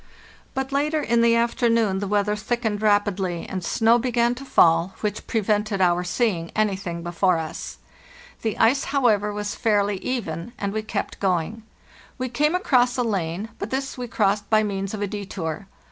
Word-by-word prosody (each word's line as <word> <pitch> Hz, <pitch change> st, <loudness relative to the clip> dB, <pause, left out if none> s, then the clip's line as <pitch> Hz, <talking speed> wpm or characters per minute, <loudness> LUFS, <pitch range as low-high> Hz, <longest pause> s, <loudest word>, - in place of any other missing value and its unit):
but 265 Hz, +1 st, -2 dB
later 300 Hz, +3 st, +1 dB
in 235 Hz, -5 st, +2 dB
the 230 Hz, 0 st, +4 dB
afternoon 230 Hz, -4 st, +2 dB
the 200 Hz, -, -3 dB
weather 210 Hz, +1 st, +1 dB
thickened 220 Hz, -1 st, -2 dB
rapidly 205 Hz, -4 st, +1 dB
204 -, -, -11 dB
FARTHEST -, -, -9 dB
NORTH 185 Hz, -2 st, -3 dB
and -, -, -2 dB
snow 230 Hz, +1 st, +5 dB
began 240 Hz, -1 st, +2 dB
to 250 Hz, +2 st, -9 dB
fall, 170 Hz, -7 st, +3 dB
which 210 Hz, -1 st, -3 dB
prevented 210 Hz, -1 st, 0 dB
our 180 Hz, -1 st, +3 dB
seeing 175 Hz, -2 st, 0 dB
anything 190 Hz, -5 st, -1 dB
before 175 Hz, +1 st, +1 dB
us. 160 Hz, -1 st, -6 dB, 0.6 s
The 220 Hz, -2 st, -2 dB
ice, 255 Hz, +5 st, +3 dB
however, 225 Hz, -7 st, +2 dB
was 205 Hz, 0 st, -3 dB
fairly 205 Hz, -2 st, +1 dB
even, 210 Hz, -3 st, -4 dB
and 200 Hz, 0 st, -3 dB
we 220 Hz, -, -1 dB
kept 215 Hz, -1 st, -4 dB
going. 190 Hz, +3 st, -1 dB, 0.6 s
We 255 Hz, -1 st, -3 dB
came 300 Hz, +7 st, +1 dB
across 250 Hz, -9 st, +2 dB
a 250 Hz, -, +2 dB
lane, 195 Hz, -2 st, -2 dB
but -, -, -4 dB
this 270 Hz, +1 st, -3 dB
we 250 Hz, -1 st, -5 dB
crossed 205 Hz, -2 st, 0 dB
by 215 Hz, -1 st, +4 dB
means 195 Hz, 0 st, -3 dB
of 205 Hz, -, -3 dB
a -, -, -1 dB
detour. 195 Hz, -3 st, -5 dB
210 Hz, 180 wpm, -23 LUFS, 190-235 Hz, 0.6 s, snow